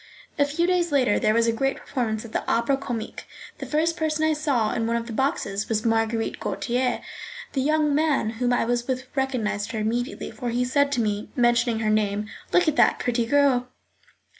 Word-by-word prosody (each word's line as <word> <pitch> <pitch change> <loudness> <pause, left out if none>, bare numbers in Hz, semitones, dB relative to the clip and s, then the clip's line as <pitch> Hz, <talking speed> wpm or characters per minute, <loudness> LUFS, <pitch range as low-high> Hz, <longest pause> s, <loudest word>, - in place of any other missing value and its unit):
A 285 - +5
few 305 +4 0
days 355 -2 +1
later 255 -7 +3
there 215 +1 +2
was 230 0 +3
a 230 - +3
great 270 +4 0
performance 225 -4 -3
at 225 - -10
the - - -1
Opera 235 +4 +2
Comique. 240 -5 -5 0.3
The - - -6
first 320 +2 +1
person 315 -2 -1
I 315 - +3
saw 280 -8 0
in 225 0 -1
one 230 - 0
of 235 0 -2
the 235 - -7
boxes 215 -6 -1
was 220 0 0
Marguerite 225 0 0
Gautier. 250 +1 -1 0.5
The 270 - 0
young 305 +1 +2
man 295 -7 +1
whom 245 0 +2
I 245 - +2
was 240 0 -1
with 260 0 -2
recognised 235 -5 -1
her 220 - -2
immediately, 235 +4 -2
for 245 -2 -4
he 245 +1 0
said 285 +2 +2
to 245 - +1
me, 210 -1 -2
mentioning 240 -2 +2
her 215 -1 +1
name: 210 -1 +1 0.3
"Look 360 -1 +4
at 305 - +1
that - - +5
pretty 235 -1 -1
girl." 270 -2 +3
245 Hz, 205 wpm, -24 LUFS, 225-285 Hz, 0.5 s, A